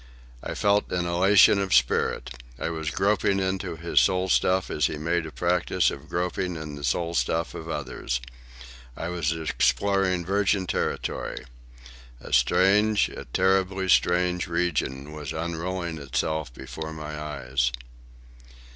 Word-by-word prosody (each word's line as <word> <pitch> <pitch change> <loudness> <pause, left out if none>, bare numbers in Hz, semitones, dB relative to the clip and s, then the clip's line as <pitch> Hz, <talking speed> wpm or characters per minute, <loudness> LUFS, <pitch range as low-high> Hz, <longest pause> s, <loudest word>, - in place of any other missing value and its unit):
I - - -5
felt 100 0 +2
an 90 -1 0
elation 95 +4 +5
of 95 -1 +1
spirit. 60 -1 +1 0.3
I - - -2
was 80 -2 -3
groping 100 +2 +1
into 95 -2 -2
his 85 +2 +2
soul 95 -1 +1
stuff 95 +1 +2
as 75 -2 +2
he 75 - -5
made 85 +2 -1
a - - -9
practice 90 +2 +1
of 70 +3 -9
groping 90 0 -2
in 80 -2 -6
the 70 0 -8
soul 85 +6 0
stuff 85 0 0
of 80 0 -7
others. 65 -4 -3 0.8
I 85 - -4
was 90 -1 -1
exploring 90 +3 +1
virgin 100 0 +1
territory. - - -3 0.7
A - - -9
strange, 100 - +4
a - - -8
terribly 95 +5 +1
strange, 90 0 +2
region 75 -5 -1
was 75 -1 -6
unrolling 85 +1 -3
itself 75 +1 -2
before 80 +6 -7
my 75 -1 -6
eyes. 65 -4 -1
85 Hz, 140 wpm, -26 LUFS, 75-95 Hz, 0.8 s, elation